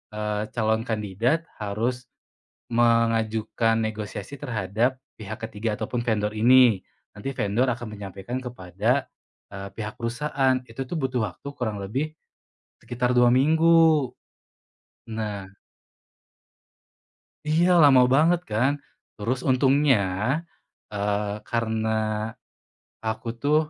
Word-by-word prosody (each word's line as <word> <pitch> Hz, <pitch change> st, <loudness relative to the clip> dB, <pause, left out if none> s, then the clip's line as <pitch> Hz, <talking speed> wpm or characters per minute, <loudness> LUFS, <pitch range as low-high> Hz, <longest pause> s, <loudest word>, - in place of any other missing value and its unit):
eee, 105 Hz, 0 st, -2 dB
calon 110 Hz, -1 st, +1 dB
kandidat 110 Hz, -, 0 dB, 0.2 s
harus 115 Hz, +5 st, -2 dB, 0.7 s
mengajukan 115 Hz, -1 st, +2 dB
negosiasi 110 Hz, +3 st, -4 dB
terhadap 115 Hz, +3 st, -1 dB, 0.2 s
pihak 110 Hz, 0 st, -7 dB
ke-3 110 Hz, -1 st, -3 dB
ataupun 120 Hz, +2 st, -2 dB
vendor 105 Hz, -2 st, 0 dB
ini. 120 Hz, -2 st, +5 dB, 0.3 s
Nanti 105 Hz, +6 st, -5 dB
vendor 110 Hz, +6 st, +1 dB
akan 120 Hz, 0 st, -7 dB
menyampaikan 100 Hz, +3 st, -6 dB
kepada, 120 Hz, +2 st, -1 dB, 0.5 s
eee, 100 Hz, 0 st, -6 dB
pihak 105 Hz, 0 st, -4 dB
perusahaan 130 Hz, +2 st, 0 dB
itu 115 Hz, +2 st, -8 dB, 0.2 s
butuh 130 Hz, -7 st, -1 dB
waktu 90 Hz, -, -13 dB
kurang 110 Hz, -6 st, -3 dB
lebih 135 Hz, +11 st, -2 dB, 0.7 s
sekitar 125 Hz, +1 st, -1 dB
2 120 Hz, 0 st, +6 dB
minggu. 160 Hz, +1 st, +4 dB, 1.0 s
Nah 105 Hz, -3 st, -4 dB, 2.0 s
Iya 160 Hz, +3 st, +3 dB
lama 135 Hz, -4 st, +7 dB
banget 165 Hz, +4 st, +4 dB
kan? 120 Hz, +6 st, +3 dB, 0.5 s
Terus 115 Hz, +5 st, -1 dB
untungnya, 135 Hz, +1 st, +4 dB, 1.0 s
eee, 105 Hz, 0 st, -1 dB
karena 110 Hz, -1 st, 0 dB, 1.2 s
aku 110 Hz, +1 st, -3 dB
tuh 145 Hz, +1 st, +3 dB
115 Hz, 100 wpm, -25 LUFS, 105-130 Hz, 2.0 s, lama